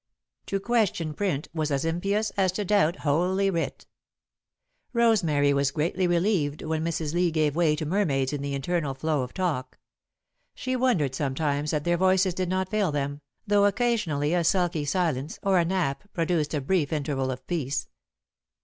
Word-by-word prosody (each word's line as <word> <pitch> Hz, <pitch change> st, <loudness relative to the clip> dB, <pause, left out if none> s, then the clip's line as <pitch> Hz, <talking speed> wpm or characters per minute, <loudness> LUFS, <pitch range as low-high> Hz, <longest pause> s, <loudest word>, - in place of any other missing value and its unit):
To 195 Hz, -, -1 dB
question 200 Hz, -8 st, 0 dB
print 155 Hz, -6 st, -2 dB
was 155 Hz, -2 st, -1 dB
as 140 Hz, +1 st, 0 dB
impious 195 Hz, +6 st, 0 dB
as 190 Hz, -2 st, +1 dB
to 205 Hz, +2 st, -2 dB
doubt 185 Hz, -4 st, +3 dB
Holy 185 Hz, +6 st, +1 dB
Writ. 165 Hz, -2 st, -3 dB, 1.1 s
Rosemary 170 Hz, -, +3 dB
was 140 Hz, 0 st, +2 dB
greatly 170 Hz, +5 st, 0 dB
relieved 170 Hz, -4 st, +1 dB
when 160 Hz, 0 st, -1 dB
Mrs. 160 Hz, -2 st, -2 dB
Lee 175 Hz, 0 st, +2 dB
gave 155 Hz, -3 st, +1 dB
way 165 Hz, -3 st, +3 dB
to 155 Hz, 0 st, -4 dB
mermaids 150 Hz, -7 st, 0 dB
in 145 Hz, -, -3 dB
the 140 Hz, 0 st, -3 dB
eternal 145 Hz, 0 st, -1 dB
flow 150 Hz, +1 st, 0 dB
of 125 Hz, -1 st, -5 dB
talk. 170 Hz, -9 st, -2 dB, 0.8 s
She 255 Hz, 0 st, -2 dB
wondered, 235 Hz, -, +1 dB
sometimes, 145 Hz, +2 st, -1 dB
that 150 Hz, -1 st, -1 dB
their 175 Hz, +1 st, +1 dB
voices 185 Hz, 0 st, +3 dB
did 185 Hz, 0 st, -2 dB
not 185 Hz, 0 st, -1 dB
fail 210 Hz, -6 st, +1 dB
them, 145 Hz, 0 st, -3 dB, 0.2 s
though 205 Hz, -1 st, +4 dB
occasionally 200 Hz, -, +1 dB
a 175 Hz, -1 st, +2 dB
sulky 175 Hz, -3 st, +1 dB
silence 155 Hz, -3 st, -1 dB
or 195 Hz, -2 st, +3 dB
a 170 Hz, -, +2 dB
nap 180 Hz, 0 st, -1 dB
produced 165 Hz, -3 st, 0 dB
a 145 Hz, -, -1 dB
brief 160 Hz, +1 st, 0 dB
interval 140 Hz, -3 st, -1 dB
of 130 Hz, 0 st, -5 dB
peace. 145 Hz, -6 st, -2 dB
165 Hz, 165 wpm, -26 LUFS, 145-190 Hz, 1.1 s, though